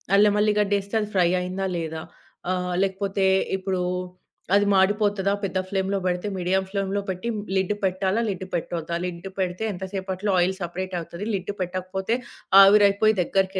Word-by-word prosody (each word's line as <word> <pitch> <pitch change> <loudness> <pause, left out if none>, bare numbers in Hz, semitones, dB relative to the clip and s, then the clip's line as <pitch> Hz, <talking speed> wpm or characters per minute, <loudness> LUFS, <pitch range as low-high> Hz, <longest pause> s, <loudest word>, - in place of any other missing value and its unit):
అల్లెం 205 0 +5
,వేల్లి 210 0 +3
గడ్డి 205 0 +2
వేస్తే 200 +3 -12
అది 210 - -4
ఫ్రై 175 -2 +4
అయిందా, 185 +2 -3
లేదా, 160 -1 -4 0.5
ఆహ్, 180 -1 -1
లేకపోతే 195 0 -1 0.3
ఇప్పుడు 185 -1 -2 0.7
అది 205 0 +4
మాడిపోతాదా, 200 0 +2
పెద్ద 190 -1 -1
ఫ్లేమ్‌లో 195 0 0
పెడితే, 180 +3 -1
మీడియం 185 +1 +1
ఫ్లేమ్‌లో 195 0 -1
పెట్టి 185 +5 -4 0.3
లిడ్ 190 +2 +1
పెట్టాలా, 190 +3 +1
లిడ్ 185 -1 -4
పెట్టొద్దా, 170 -1 -3
లిడ్ 175 +1 -6
పెడితే, 180 +3 -1
ఎంత 185 +1 -5
సేపట్లో 190 +1 -2
ఆయిల్ 180 +2 +2
సెపరేట్ 185 +2 -4
అవుతది, 170 +4 -7
లిడ్ 190 +1 -2
పెట్టకపోతే, 185 +4 -2 0.5
ఆవిరి 205 +1 +7
అయిపోయి 215 +2 +2
దగ్గరికి 190 +1 0
190 Hz, 155 wpm, -24 LUFS, 180-200 Hz, 0.7 s, ఆవిరి